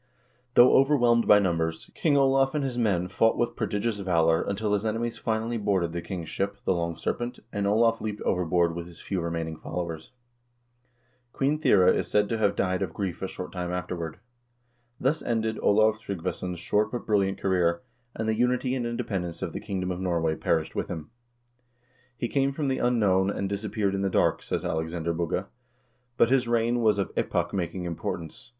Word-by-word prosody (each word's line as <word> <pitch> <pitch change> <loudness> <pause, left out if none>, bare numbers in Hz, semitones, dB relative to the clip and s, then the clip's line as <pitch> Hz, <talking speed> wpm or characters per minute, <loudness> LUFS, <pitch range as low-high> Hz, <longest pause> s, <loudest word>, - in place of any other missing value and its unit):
Though 125 +1 +8
overwhelmed 120 -4 +4
by 105 - +8
numbers, 80 -4 -1
King 150 -3 +2
Olav 135 +1 +3
and 150 - 0
his 130 -2 -2
men 100 -7 +1
fought 115 +4 +2
with 120 0 0
prodigious 105 0 -1
valor 85 -4 +2
until 105 +1 -1
his 100 0 +1
enemies 115 +1 -2
finally 115 +1 -1
boarded 95 -5 +1
the 85 - -3
king's 85 -3 -6
ship, 100 +4 -2
the - - +3
"Long 85 -1 -2
Serpent," 120 +1 -3 0.2
and 100 -1 0
Olav 115 +2 +3
leaped 105 -1 -4
over 90 -1 +1
board 85 0 +2
with 85 0 -6
his 85 -2 -14
few 95 -3 -3
remaining 85 -1 -3
followers. 80 0 -5 1.2
Queen 145 +3 +1
Thyre 105 - +5
is - - +3
said 105 -1 +2
to 115 - -1
have 100 -2 +2
died 95 0 0
of 90 -4 -3
grief 95 -4 -3
a 95 - -1
short 90 -1 -7
time 90 -1 -4
afterward.2 90 -3 -4 0.8
Thus 145 +5 +1
ended 110 -1 -1
Olav 110 +1 +4
Tryggvason's 90 -3 -4
short 105 +5 0
but 120 - -4
brilliant 100 -2 +1
career, 90 -3 +1 0.3
and 110 - -3
the 110 - +2
unity 125 +2 +1
and 125 -3 -1
independence 95 -7 -3
of - - -4
the - - -4
kingdom 95 -2 -3
of 90 - -4
Norway 85 -4 0
perished 80 -1 0
with - - -2
himi 80 -1 -6 0.6
" 125 +1 -38
He 120 - -2
came 135 +2 +1
from 140 0 -2
the 130 - 0
unknown, 100 -6 +2
and 100 -1 -2
disappeared 100 0 -1
in 95 - -1
the 100 - +1
dark," - - +2
says - - -3
Alexander 80 +1 -2
Bugge, 85 +2 -1 0.7
"but 115 - +4
his 130 -2 +3
reign 120 +1 +1
was 110 -3 +3
of 100 - -1
epoch - - -1
making 90 -1 -2
importance. 85 +3 -5
100 Hz, 190 wpm, -27 LUFS, 90-115 Hz, 1.2 s, Though